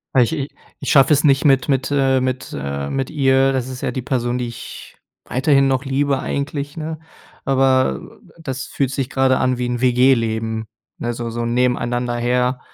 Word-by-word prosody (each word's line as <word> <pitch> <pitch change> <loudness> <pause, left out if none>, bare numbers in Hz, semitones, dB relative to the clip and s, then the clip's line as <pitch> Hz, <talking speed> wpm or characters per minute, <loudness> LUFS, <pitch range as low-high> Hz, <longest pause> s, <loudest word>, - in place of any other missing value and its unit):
Weil 125 - +6
ich 120 - -1
i 140 -3 -2 0.3
ich - - -2
schaffe 135 +1 +6
es 145 - +2
nicht 140 0 +3
mit 135 -1 +3
mit, 135 0 0
äh 135 -2 +3
mit 130 0 -3
äh, 70 0 -4
mit 135 -1 -2
ihr. 135 -2 +3
Das 130 -2 -1
ist 130 -1 -7
ja - - -1
die 130 - -4
Person, 125 -2 -1
die 125 - -2
ich 115 0 -10 0.3
weiterhin 135 +1 +2
noch 135 0 0
liebe 135 0 0
eigentlich, 145 +3 -4
ne? 155 0 -5 0.5
Aber 130 - +1 0.2
das 130 -4 -5
fühlt 135 -3 -1
sich 135 -1 -2
gerade 130 -1 +2
an 130 -1 +1
wie 125 - -1
'n 120 0 -3
WG-Leben 115 -3 +2 0.3
ne, 120 0 -3
so 120 0 -5
so 120 +1 -3
nebeneinander 120 0 0
her 125 +1 0
130 Hz, 190 wpm, -20 LUFS, 120-135 Hz, 0.5 s, Weil